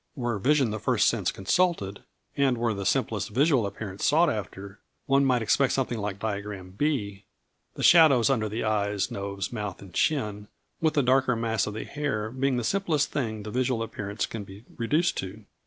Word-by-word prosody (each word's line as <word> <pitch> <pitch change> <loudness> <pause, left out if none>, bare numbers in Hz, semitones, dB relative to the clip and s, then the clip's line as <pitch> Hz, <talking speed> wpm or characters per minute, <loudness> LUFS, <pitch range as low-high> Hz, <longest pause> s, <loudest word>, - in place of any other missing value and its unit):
Were 120 -5 -2
vision 135 0 +2
the 110 - -3
first - - +2
sense - - +1
consulted, 100 - 0 0.3
and 135 -3 +2
were 115 -1 0
the 100 -2 -3
simplest 110 -2 0
visual 130 -1 +2
appearance 100 -1 -7
sought 160 +2 +4
after, 100 -2 -6 0.3
one 140 +1 +3
might 125 -3 +2
expect 135 +5 +2
something 125 -4 -1
like 100 -1 -3
diagram 100 -3 -5
B, 100 -5 -2 0.5
the - - -5
shadows 155 -9 +6
under 120 -6 +1 0.2
eyes, 105 -2 0
nose, 100 +1 -4
mouth, 105 -5 -4
and 95 -3 -13
chin, 105 - 0 0.3
with 160 -1 +1
the 145 - +3
darker 130 -1 +3
mass 115 -3 0
of 105 - -5
the 110 - -4
hair 135 -8 -3
being 130 0 0
the 120 - -1
simplest 155 - 0
thing 110 -6 -3
the 105 - -6
visual 125 -1 0
appearance 105 -1 -4
can 110 -2 -6
be 100 +3 -13
reduced 150 +9 +1
to. 100 +3 -6
115 Hz, 180 wpm, -27 LUFS, 100-135 Hz, 0.5 s, shadows